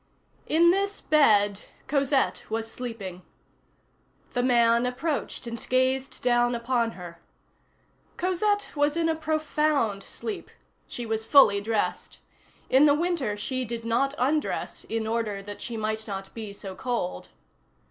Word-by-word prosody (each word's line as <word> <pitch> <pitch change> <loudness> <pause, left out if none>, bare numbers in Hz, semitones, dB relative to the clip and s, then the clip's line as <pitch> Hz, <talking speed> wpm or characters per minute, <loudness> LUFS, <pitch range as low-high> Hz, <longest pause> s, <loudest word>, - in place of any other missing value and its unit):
In 340 +2 +5
this 400 +2 0
bed 205 -9 +4 0.3
Cosette 275 -1 +1
was 225 0 -3
sleeping. 210 -7 -6 1.1
The 245 - +1
man 235 -1 +4
approached 270 +2 -3
and 235 -1 -5
gazed 260 +1 +1
down 240 0 +3
upon 235 -1 0
her. 170 -2 -10 1.0
Cosette 410 +3 0
was 290 +2 +1
in 330 -1 +2
a 325 - +2
profound 305 -8 0
sleep; 420 - -6 0.4
she 240 - -6
was 220 -1 -2
fully 215 -6 +6
dressed. 220 0 -2 0.5
In 270 +3 +5
the 290 -1 +5
winter 300 -10 -1
she 255 +5 -2
did 230 -1 -5
not 270 +5 +1
undress, 295 +4 -1
in 225 -1 -2
order 220 -3 -2
that 205 +1 -8
she 235 -1 -5
might 220 0 -3
not 195 -1 -6
be 220 -3 -6
so 200 -1 -8
cold. 235 -4 -3
240 Hz, 135 wpm, -26 LUFS, 220-290 Hz, 1.1 s, fully